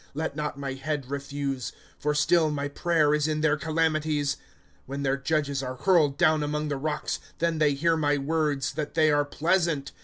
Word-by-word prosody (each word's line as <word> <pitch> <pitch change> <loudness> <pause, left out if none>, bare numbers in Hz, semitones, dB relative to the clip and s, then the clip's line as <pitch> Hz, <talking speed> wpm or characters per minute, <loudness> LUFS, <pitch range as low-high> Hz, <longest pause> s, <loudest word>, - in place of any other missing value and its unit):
Let 155 -1 -2
not 150 -1 -3
my 140 -1 -4
head 135 0 -4
refuse; 140 -2 -3 0.3
for 150 0 0
still, 155 +2 +3
My 145 -1 -2
prayer 155 0 +2
is 150 0 +2
in 155 -1 -1
their 155 -1 +3
calamities. 155 -2 0
^ - - -22 0.5
When 140 +1 -4
their 135 0 +2
judges 140 -1 -1
are 130 -1 -4
hurled 150 -1 +3
down 155 -1 +4
among 150 +1 -2
the 145 - -1
rocks, 150 +2 -2 0.2
Then 165 -1 0
they 150 -2 +3
hear 165 +4 +2
my 145 -2 +1
words, 145 -2 0
that 150 -1 -4
they 155 -1 +4
are 145 0 +3
pleasant. 165 -2 0
150 Hz, 190 wpm, -27 LUFS, 140-155 Hz, 0.5 s, down